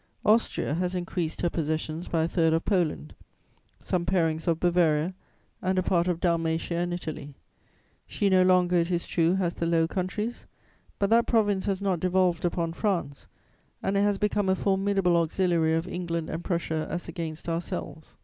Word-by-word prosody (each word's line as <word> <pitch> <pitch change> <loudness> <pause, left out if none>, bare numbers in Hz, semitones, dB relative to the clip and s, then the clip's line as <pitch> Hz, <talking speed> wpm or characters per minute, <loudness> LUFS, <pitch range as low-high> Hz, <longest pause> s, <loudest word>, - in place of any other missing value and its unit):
"Austria 215 -8 +2
has 180 +3 -1
increased 175 -2 -3
her 175 - +1
possessions 155 +1 -2
by 165 -2 +1
a - - +1
third 165 -1 +2
of 165 - 0
Poland, 160 - 0 0.7
some 180 -2 -1
parings 165 -2 0
of 165 -1 +2
Bavaria 170 -1 +2 0.5
and 185 0 0
a 185 - +2
part 175 -1 +1
of 175 -2 0
Dalmatia 165 -1 0
and 175 0 -1
Italy. 155 -5 -6 0.7
She 205 - 0
no 190 -1 +5
longer, 180 -1 +4
it 170 0 +1
is 175 -1 -1
true, 170 +1 +2
has 180 -3 0
the 170 - -2
Low 165 -1 +2
Countries; 205 +7 -3 0.5
but 200 +1 0
that 230 +1 +4
province 205 -4 +1
has 195 0 -1
not 190 -4 +1
devolved 180 -1 +1
upon 170 -1 -1
France, 175 -8 -2 0.6
and 195 - 0
it 200 - +3
has 205 -1 +2
become 205 -1 0
a 190 - +3
formidable 195 -2 +1
auxiliary 165 -1 +1
of 165 +2 -1
England 170 -3 -3
and 165 +2 -4
Prussia 160 -3 -2
as 175 - -4
against 165 -2 -6
ourselves. 165 -2 -5
175 Hz, 175 wpm, -27 LUFS, 165-185 Hz, 0.7 s, no